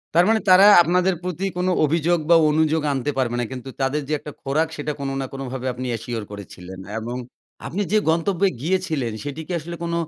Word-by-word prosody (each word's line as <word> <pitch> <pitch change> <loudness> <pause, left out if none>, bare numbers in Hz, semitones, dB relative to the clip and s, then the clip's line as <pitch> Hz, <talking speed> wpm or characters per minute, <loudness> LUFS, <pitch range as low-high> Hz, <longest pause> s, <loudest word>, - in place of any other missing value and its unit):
তার 175 +1 +6
মানে 225 0 +4
তারা 185 +2 +8 0.2
আপনাদের 180 +3 +2
প্রতি 180 +1 -3
কোন 180 +1 0 0.2
অভিযোগ 165 +3 +1
বা 170 - +7
অনুযোগ 160 +1 +2
আনতে 135 +2 -1
পারবে 120 -2 0
না। 120 - 0
কিন্তু 130 0 -7
তাদের 135 +3 0
যে 155 - -2
একটা 150 - -9
খোরাক 150 +4 0
সেটা 150 +1 -3
কোন 140 -1 -3
না - - -2
কোনভাবে 130 -1 -5
আপনি 130 +1 -6
অ্যাশিওর 115 -1 -4
করেছিলেন। 95 -2 -9 0.2
এবং 120 +2 -5 0.5
আপনি 200 +4 -3
যে 215 - +4
গন্তব্যে 175 +4 +2
গিয়েছিলেন 160 -7 -1
সেটি 145 +2 -5
কি - - -6
আসলে 170 +3 -7
কোন 170 0 -2
150 Hz, 195 wpm, -22 LUFS, 130-175 Hz, 0.5 s, তারা